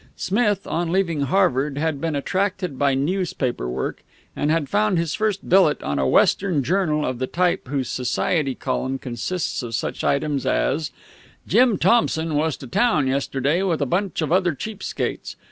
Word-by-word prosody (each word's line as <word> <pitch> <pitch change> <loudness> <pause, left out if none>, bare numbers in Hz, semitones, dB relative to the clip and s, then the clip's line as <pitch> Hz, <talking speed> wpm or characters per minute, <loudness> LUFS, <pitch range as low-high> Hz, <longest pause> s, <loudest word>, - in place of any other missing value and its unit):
Smith, 205 -1 0
on 165 0 -2
leaving 170 -5 +1
Harvard, 140 -3 +1
had 155 -2 -1
been 165 -2 -1
attracted 185 -1 -2
by 140 -1 +3
newspaper 140 - -1
work, 65 +1 -4 0.3
and 145 - 0
had 160 -2 +1
found 205 0 +1
his 165 -2 -1
first 215 -2 -1
billet 180 -5 +4
on 70 -1 -1
a 65 - +1
Western 175 - +3
journal 155 -1 +1
of 130 -1 -3
the 130 - -1
type 175 -3 0
whose 135 -1 -2
society 135 +3 -1
column 130 +1 -2
consists 130 +9 -3
of 115 -2 -4
such 115 - -3
items 140 -1 0
as 155 +1 0 0.6
"Jim 245 -5 +4
Thompson 165 -9 +2
was 155 +1 0
to - - -10
town 155 - +2
yesterday 135 +4 0
with 180 -5 0
a 140 - +1
bunch 175 +3 -1
of 155 - -2
other 180 -3 +2
cheap 210 +7 -7
skates. - - -4
155 Hz, 170 wpm, -22 LUFS, 135-185 Hz, 0.6 s, billet